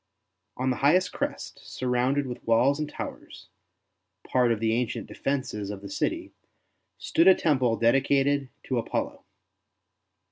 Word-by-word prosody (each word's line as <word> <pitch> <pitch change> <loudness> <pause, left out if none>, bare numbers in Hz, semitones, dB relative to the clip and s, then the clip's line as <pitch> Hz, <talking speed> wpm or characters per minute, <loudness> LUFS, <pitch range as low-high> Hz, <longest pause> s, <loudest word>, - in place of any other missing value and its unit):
On 130 +1 0
the 125 - -2
highest 180 +6 +3
crest, - - -4
surrounded 130 +3 0
with 125 -2 -7
walls 125 +6 +3
and 150 -1 -2
towers - - -8 0.4
— - - -27
part 125 -2 +3
of 115 - 0
the 110 0 +1
ancient 120 0 -2
defences 130 -7 -3
of 100 -1 -7
the 100 - -8
city - - -2 0.3
— - - -48 0.2
stood 165 - +2
a 190 - +9
temple 130 -7 +1
dedicated 135 +3 +2
to 130 -3 -1
Apollo. - - -3
130 Hz, 145 wpm, -27 LUFS, 115-140 Hz, 0.4 s, a